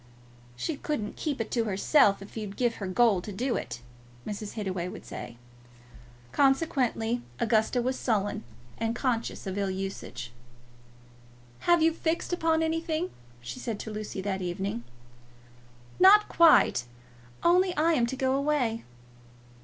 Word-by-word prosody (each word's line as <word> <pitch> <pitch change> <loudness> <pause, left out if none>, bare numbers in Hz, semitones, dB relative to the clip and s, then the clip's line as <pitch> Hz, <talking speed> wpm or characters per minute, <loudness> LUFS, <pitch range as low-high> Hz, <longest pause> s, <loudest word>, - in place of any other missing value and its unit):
"She 290 - -3
couldn't 250 -10 -3
keep 290 -5 -3
it 225 - -3
to 230 -2 +1
herself 200 +1 +3
if 200 - -14
you'd 210 -3 -6
give 240 -2 +1
her 195 - -4
gold 200 -2 +3
to 210 - -5
do 240 +5 -1
it," 120 - -5 0.4
Mrs. 210 0 -5
Hittaway 190 -5 -3
would - - -9
say. 120 - -8 0.9
Consequently 260 -5 +1 0.2
Augusta 230 +1 +2
was 255 +1 -1
sullen 205 -4 0 0.4
and 225 +1 -1
conscious 240 -4 -2
of 190 +1 -3
ill 200 -1 0
usage. 190 -11 -5 1.4
"Have 345 -2 +6
you 325 0 +4
fixed 325 +2 -1
upon 325 -2 +2
anything?" 325 +2 -1 0.3
she 120 +1 -7
said 225 -4 -4
to 220 - -6
Lucy 210 -2 -5
that 190 -1 -2
evening. 180 -6 -3 1.2
"Not 415 +3 +8
quite; 325 - +5 0.6
only 360 +1 +4
I 330 +2 +3
am 240 -6 +2
to 265 - -3
go 260 0 +1
away." 275 -5 0
230 Hz, 140 wpm, -28 LUFS, 200-300 Hz, 1.4 s, Not